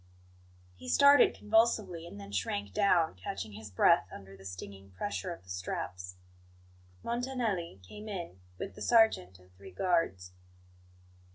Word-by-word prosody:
He 125 +7 -9
started 280 - +6
convulsively, 210 -6 +1
and 100 - -10
then 100 0 -9
shrank 100 0 -2
down, 175 -5 +3
catching 95 +3 -6
his 105 +1 -9
breath 95 - +4
under 95 0 -11
the 95 0 -15
stinging 95 +1 -9
pressure 185 - -4
of 170 - -8
the 90 - -11
straps. 90 0 -5 0.9
Montanelli 235 - -2
came 210 - -9
in 170 - -6 0.2
with 95 - -5
the - - -12
sergeant 220 - +3
and 90 0 -22
three 95 +1 -13
guards. 95 - 0
100 Hz, 140 wpm, -31 LUFS, -, 0.9 s, started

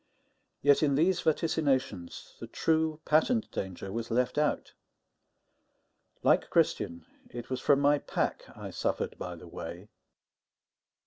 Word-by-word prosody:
Yet 145 0 +5
in 145 -3 +3
these 175 +5 +2
vaticinations, 145 - -1
the - - -7
true, 160 -1 0
patent 210 +9 +2
danger 95 0 -5
was 115 +2 -4
left 125 +4 +1
out. 150 - 0 1.5
Like - - +3
Christian, 85 -1 0 0.2
it 120 +1 -8
was 130 0 -2
from 140 -1 +4
my 145 +1 +4
pack - - -2
I - - -7
suffered - - -2
by 90 -1 -5
the 85 +1 -12
way. 85 +4 -8
135 Hz, 125 wpm, -30 LUFS, 95-155 Hz, 1.5 s, Yet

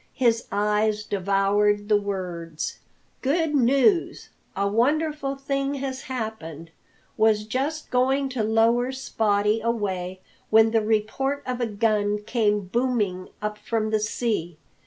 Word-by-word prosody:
His 235 -3 +2
eyes 210 +1 +1
devoured 205 +1 +1
the 210 -1 +3
words: 175 -5 -4 0.4
"Good 305 +3 +1
news! 275 - +2 0.3
A 200 +1 0
wonderful 275 +5 0
thing 275 0 -2
has 265 -1 -4
happened. 215 - -6 0.5
Was 215 -1 +3
just 275 +8 -3
going 265 +2 +2
to 255 -3 -2
lower 230 +3 +2
Spottie 215 -4 0
away 190 -5 -2 0.3
when 220 0 +5
the 225 -1 +3
report 225 +6 -1
of 250 -1 -3
a 240 - +1
gun 210 -1 0
came 210 -2 +1
booming 205 -3 -1
up 210 0 -3
from 215 0 -2
the 215 - +2
sea. 210 -6 -2
220 Hz, 125 wpm, -25 LUFS, 205-260 Hz, 0.5 s, when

